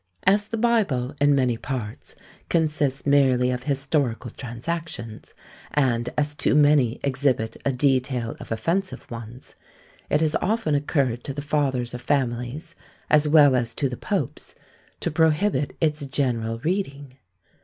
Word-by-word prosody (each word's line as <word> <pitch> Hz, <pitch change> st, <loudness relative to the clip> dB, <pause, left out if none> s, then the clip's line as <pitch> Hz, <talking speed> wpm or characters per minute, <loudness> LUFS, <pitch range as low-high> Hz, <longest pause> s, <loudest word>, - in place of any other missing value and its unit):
As 200 Hz, +2 st, +3 dB
the 225 Hz, -, -3 dB
Bible, 200 Hz, -, +1 dB
in 145 Hz, 0 st, +5 dB
many 125 Hz, -4 st, +1 dB
parts, 115 Hz, -5 st, -6 dB, 0.3 s
consists 150 Hz, -5 st, 0 dB
merely 130 Hz, -3 st, +4 dB
of 125 Hz, 0 st, -4 dB
historical 140 Hz, -3 st, -1 dB
transactions, 120 Hz, -2 st, -6 dB, 0.4 s
and 125 Hz, -4 st, +1 dB
as 150 Hz, 0 st, 0 dB
too 145 Hz, -, +1 dB
many 145 Hz, -5 st, +4 dB
exhibit 130 Hz, -5 st, 0 dB
a 140 Hz, -, +3 dB
detail 130 Hz, -3 st, 0 dB
of -, -, -10 dB
offensive 170 Hz, +12 st, -1 dB
ones, 115 Hz, +2 st, -9 dB, 0.6 s
it 150 Hz, -, +3 dB
has 155 Hz, -1 st, +1 dB
often 215 Hz, -4 st, 0 dB
occurred 140 Hz, -4 st, 0 dB
to 140 Hz, -, -5 dB
the 145 Hz, -, -3 dB
fathers 135 Hz, -5 st, 0 dB
of 125 Hz, -, -6 dB
families, 130 Hz, +5 st, -2 dB, 0.4 s
as 150 Hz, 0 st, +5 dB
well 145 Hz, -3 st, +6 dB
as 120 Hz, -2 st, -1 dB
to 140 Hz, -, 0 dB
the 125 Hz, -, -5 dB
popes, -, -, -4 dB, 0.5 s
to -, -, -1 dB
prohibit 160 Hz, -1 st, +1 dB
its 155 Hz, -2 st, +1 dB
general 120 Hz, -5 st, -1 dB
reading. 145 Hz, -7 st, -3 dB
140 Hz, 140 wpm, -24 LUFS, 125-150 Hz, 0.6 s, well